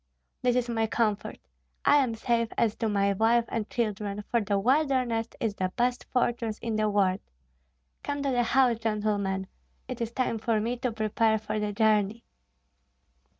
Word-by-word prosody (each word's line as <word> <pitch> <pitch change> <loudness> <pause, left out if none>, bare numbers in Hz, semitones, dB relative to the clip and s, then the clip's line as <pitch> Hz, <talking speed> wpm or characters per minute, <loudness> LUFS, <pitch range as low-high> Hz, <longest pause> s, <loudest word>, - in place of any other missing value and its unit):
This 245 -1 +2
is 250 -1 +1
my 225 -2 0
comfort: 215 -2 -1 0.5
I 290 - +6
am 255 -5 +1
safe 230 0 0
as 220 -2 +2
to 225 -2 -1
my 200 -1 +2
wife 225 +3 +3
and 220 -2 -3
children, 210 -3 -2
for 235 -1 +3
the 205 -1 0
wilderness 250 -1 +1
is 225 -3 -1
the 185 -2 -2
best 245 +1 0
fortress 235 -3 0
in 230 -2 -3
the 215 0 +1
world. 195 -2 +2 0.8
Come 285 0 -3
to 275 - 0
the 245 -1 +2
house, 240 -1 +3
gentlemen; 205 -3 -1 0.4
it 255 -1 -6
is 230 0 -2
time 235 -2 -1
for 220 0 +1
me 230 +3 -1
to 250 0 -2
prepare 220 0 +1
for 215 0 -3
the 210 0 -1
journey." 215 0 +2
225 Hz, 170 wpm, -28 LUFS, 210-240 Hz, 0.8 s, I